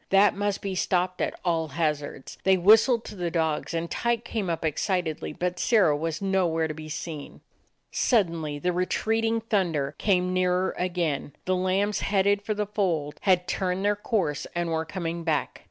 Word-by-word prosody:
That 195 Hz, +1 st, +5 dB
must 205 Hz, 0 st, -1 dB
be 195 Hz, -1 st, -2 dB
stopped 185 Hz, 0 st, 0 dB
at -, -, -2 dB
all 165 Hz, -2 st, +1 dB
hazards. 150 Hz, -3 st, -3 dB
They 190 Hz, 0 st, +4 dB
whistled 220 Hz, +5 st, +5 dB
to -, -, -8 dB
the 175 Hz, -3 st, -2 dB
dogs, 160 Hz, -2 st, -1 dB
and 165 Hz, +1 st, -1 dB
Tyke 235 Hz, +4 st, -1 dB
came 215 Hz, -6 st, -2 dB
up 165 Hz, -1 st, -2 dB
excitedly; 160 Hz, +1 st, -1 dB
but 180 Hz, +3 st, -3 dB
Sirrah 205 Hz, -11 st, +4 dB
was 165 Hz, +4 st, -3 dB
no 190 Hz, -2 st, +2 dB
where 160 Hz, -1 st, 0 dB
to 155 Hz, -, -4 dB
be 155 Hz, 0 st, -9 dB
seen. 155 Hz, -1 st, -6 dB, 0.5 s
Suddenly 165 Hz, -, +1 dB
the 180 Hz, +4 st, -1 dB
retreating 225 Hz, +5 st, 0 dB
thunder 170 Hz, -10 st, 0 dB
came 180 Hz, -3 st, +2 dB
nearer 185 Hz, 0 st, +1 dB
again. 170 Hz, -6 st, -2 dB
The 185 Hz, -, +1 dB
lambs 190 Hz, +3 st, +1 dB
headed 200 Hz, 0 st, +2 dB
for 215 Hz, +1 st, -2 dB
the 210 Hz, 0 st, -1 dB
fold 175 Hz, -8 st, -1 dB
had 180 Hz, -2 st, +3 dB
turned 185 Hz, +1 st, -1 dB
their 205 Hz, 0 st, +3 dB
course 200 Hz, -, -1 dB
and 175 Hz, -1 st, -1 dB
were 160 Hz, 0 st, -1 dB
coming 170 Hz, 0 st, -4 dB
back. 160 Hz, -2 st, -1 dB
180 Hz, 175 wpm, -26 LUFS, 160-200 Hz, 0.5 s, That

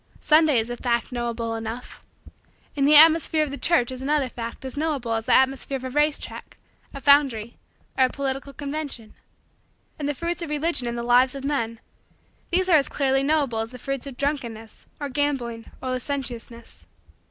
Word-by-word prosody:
Sunday 310 Hz, -3 st, +4 dB
is 225 Hz, +1 st, 0 dB
a -, -, -3 dB
fact 235 Hz, -1 st, -1 dB
knowable 235 Hz, -2 st, -3 dB
enough. 225 Hz, +2 st, -7 dB, 0.7 s
And 280 Hz, -1 st, +2 dB
the 300 Hz, -, +6 dB
atmosphere 320 Hz, 0 st, +6 dB
of 295 Hz, -, -4 dB
the -, -, -4 dB
church 285 Hz, -8 st, +2 dB
is 255 Hz, 0 st, -5 dB
another 280 Hz, -1 st, 0 dB
fact 230 Hz, +2 st, -7 dB
as 260 Hz, -, -5 dB
knowable 285 Hz, -6 st, -1 dB
as 225 Hz, 0 st, -3 dB
the -, -, +4 dB
atmosphere 270 Hz, +1 st, +1 dB
of 260 Hz, -, -12 dB
a 260 Hz, -, -5 dB
race 295 Hz, +2 st, +2 dB
track, -, -, -9 dB, 0.3 s
a 275 Hz, -, -7 dB
foundry, 270 Hz, -6 st, +3 dB, 0.4 s
or 260 Hz, -, +5 dB
a -, -, -1 dB
political 275 Hz, +1 st, -4 dB
convention. 280 Hz, -5 st, -5 dB, 0.9 s
And 290 Hz, -1 st, -2 dB
the 290 Hz, -, -2 dB
fruits 340 Hz, +3 st, -3 dB
of 335 Hz, -, -4 dB
Religion 300 Hz, -3 st, 0 dB
in 235 Hz, -, -3 dB
the 235 Hz, -, -4 dB
lives 250 Hz, +2 st, +4 dB
of 275 Hz, -, -7 dB
men 230 Hz, -6 st, -2 dB, 0.7 s
these 370 Hz, +1 st, +2 dB
are 340 Hz, -4 st, +6 dB
as 280 Hz, -, +1 dB
clearly 270 Hz, -1 st, +1 dB
knowable 280 Hz, -5 st, +1 dB
as 225 Hz, 0 st, -2 dB
the 250 Hz, -, -10 dB
fruits 275 Hz, +2 st, -4 dB
of 265 Hz, -3 st, -9 dB
drunkenness, 235 Hz, -7 st, -4 dB
or 290 Hz, -, -3 dB
gambling, 255 Hz, -5 st, -2 dB
or 260 Hz, -, -2 dB
licentiousness. 245 Hz, -3 st, -5 dB
270 Hz, 185 wpm, -24 LUFS, 235-290 Hz, 0.9 s, the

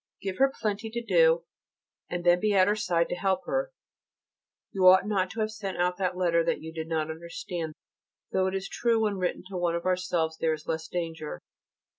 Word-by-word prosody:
Give 190 Hz, -1 st, -5 dB
her 270 Hz, 0 st, +5 dB
plenty 215 Hz, 0 st, -2 dB
to 235 Hz, +1 st, -4 dB
do, 165 Hz, -5 st, +4 dB, 0.7 s
and 175 Hz, 0 st, -3 dB
then 175 Hz, 0 st, +5 dB
be 210 Hz, +1 st, +1 dB
at 185 Hz, -1 st, +5 dB
her 205 Hz, -, +3 dB
side 175 Hz, -6 st, +1 dB
to -, -, -1 dB
help 190 Hz, 0 st, 0 dB
her. -, -, -1 dB, 1.0 s
You 185 Hz, -1 st, +3 dB
ought 185 Hz, +1 st, +7 dB
not 195 Hz, -3 st, 0 dB
to 220 Hz, -, -4 dB
have 215 Hz, 0 st, 0 dB
sent 200 Hz, -4 st, -5 dB
out 180 Hz, 0 st, +1 dB
that 185 Hz, -2 st, -1 dB
letter 170 Hz, -2 st, +3 dB
that -, -, 0 dB
you 160 Hz, 0 st, -8 dB
did 160 Hz, -1 st, -5 dB
not 160 Hz, -1 st, -1 dB
understand, 165 Hz, 0 st, -6 dB, 0.6 s
though 190 Hz, 0 st, +2 dB
it 190 Hz, -, -2 dB
is 195 Hz, 0 st, -3 dB
true 230 Hz, -2 st, +1 dB
when 205 Hz, -2 st, 0 dB
written 180 Hz, -1 st, -2 dB
to 190 Hz, -, -4 dB
one 175 Hz, -1 st, 0 dB
of 170 Hz, -, -4 dB
ourselves 175 Hz, -3 st, 0 dB
there 160 Hz, -1 st, +2 dB
is 155 Hz, -1 st, -7 dB
less 160 Hz, 0 st, -3 dB
danger. 165 Hz, -3 st, -4 dB
180 Hz, 210 wpm, -28 LUFS, 165-200 Hz, 1.0 s, ought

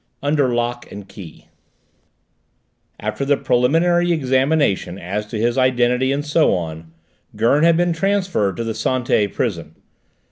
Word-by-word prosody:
UNDER 145 Hz, -3 st, +1 dB
LOCK 120 Hz, 0 st, -3 dB
AND 100 Hz, -1 st, -9 dB
KEY 85 Hz, -7 st, -12 dB, 1.5 s
After -, -, -3 dB
the 140 Hz, 0 st, +2 dB
preliminary 170 Hz, +8 st, +2 dB
examination 130 Hz, -, +1 dB
as 100 Hz, +4 st, -4 dB
to 110 Hz, -, -5 dB
his 120 Hz, +4 st, 0 dB
identity 125 Hz, 0 st, +2 dB
and 145 Hz, +1 st, -2 dB
so 155 Hz, +2 st, +2 dB
on, 80 Hz, -2 st, -6 dB, 0.4 s
Gurn 140 Hz, +6 st, +2 dB
had 165 Hz, -1 st, +4 dB
been 175 Hz, 0 st, +1 dB
transferred 185 Hz, -, 0 dB
to 115 Hz, -, -2 dB
the 115 Hz, -1 st, -3 dB
Santé 115 Hz, -5 st, 0 dB
prison. 85 Hz, -9 st, -3 dB
125 Hz, 135 wpm, -19 LUFS, 105-150 Hz, 1.5 s, had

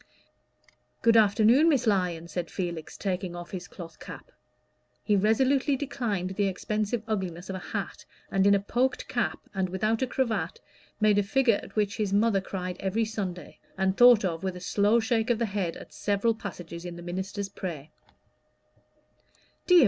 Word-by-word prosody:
"Good 230 Hz, 0 st, +5 dB
afternoon, 225 Hz, +8 st, +5 dB
Miss 280 Hz, -5 st, +2 dB
Lyon," 180 Hz, -6 st, +1 dB
said 175 Hz, 0 st, -4 dB
Felix, 170 Hz, -4 st, -5 dB
taking 185 Hz, -2 st, -3 dB
off 175 Hz, 0 st, -8 dB
his 180 Hz, -2 st, -6 dB
cloth 170 Hz, -4 st, -10 dB
cap: -, -, -10 dB, 0.7 s
he 210 Hz, -, +2 dB
resolutely 260 Hz, +7 st, +3 dB
declined 235 Hz, -9 st, -2 dB
the 200 Hz, +1 st, 0 dB
expensive 215 Hz, +3 st, -2 dB
ugliness 185 Hz, -4 st, -3 dB
of -, -, -4 dB
a -, -, -4 dB
hat, -, -, -5 dB, 0.3 s
and 195 Hz, 0 st, +3 dB
in 200 Hz, -, +6 dB
a -, -, +3 dB
poked 245 Hz, +6 st, -1 dB
cap 240 Hz, -2 st, -1 dB, 0.2 s
and 190 Hz, -2 st, -1 dB
without 215 Hz, +5 st, 0 dB
a 260 Hz, -, +1 dB
cravat, 220 Hz, -10 st, -1 dB, 0.4 s
made 210 Hz, -1 st, +4 dB
a -, -, +4 dB
figure 230 Hz, +1 st, +2 dB
at -, -, -13 dB
which 205 Hz, -1 st, 0 dB
his 210 Hz, -3 st, -1 dB
mother 205 Hz, -1 st, +3 dB
cried 185 Hz, -1 st, -5 dB
every 200 Hz, +4 st, 0 dB
Sunday, 195 Hz, -5 st, -5 dB, 0.2 s
and 190 Hz, 0 st, +1 dB
thought 240 Hz, -3 st, +7 dB
of 165 Hz, -3 st, -2 dB
with 190 Hz, -1 st, -2 dB
a -, -, -7 dB
slow 205 Hz, +5 st, +2 dB
shake 225 Hz, 0 st, 0 dB
of 240 Hz, -, +3 dB
the 235 Hz, -, 0 dB
head 195 Hz, -5 st, -2 dB
at -, -, -12 dB
several 205 Hz, +3 st, +1 dB
passages 175 Hz, -5 st, -8 dB
in 175 Hz, -1 st, -6 dB
the 175 Hz, -, -9 dB
minister's 190 Hz, +3 st, -4 dB
prayer. 165 Hz, -7 st, -6 dB
200 Hz, 170 wpm, -28 LUFS, 180-225 Hz, 0.7 s, thought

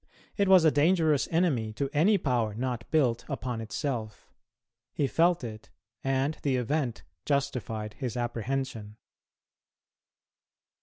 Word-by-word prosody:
It 200 Hz, -2 st, +2 dB
was 185 Hz, -3 st, +7 dB
a 160 Hz, -, +6 dB
dangerous 155 Hz, -1 st, +3 dB
enemy 145 Hz, -11 st, +1 dB
to 140 Hz, +5 st, -2 dB
any 190 Hz, +8 st, +4 dB
power 120 Hz, -, 0 dB
not 120 Hz, 0 st, -3 dB
built 125 Hz, -7 st, +2 dB
upon 125 Hz, -3 st, -3 dB
itself; 115 Hz, -1 st, -4 dB, 0.7 s
he 145 Hz, -, +1 dB
felt 170 Hz, +3 st, +2 dB
it, 110 Hz, -2 st, -8 dB, 0.3 s
and 135 Hz, +3 st, 0 dB
the 140 Hz, -3 st, +1 dB
event 125 Hz, 0 st, -1 dB, 0.2 s
justified 125 Hz, -7 st, -2 dB
his 125 Hz, -3 st, -3 dB
apprehension. 120 Hz, -2 st, -3 dB
130 Hz, 115 wpm, -28 LUFS, 115-150 Hz, 0.7 s, was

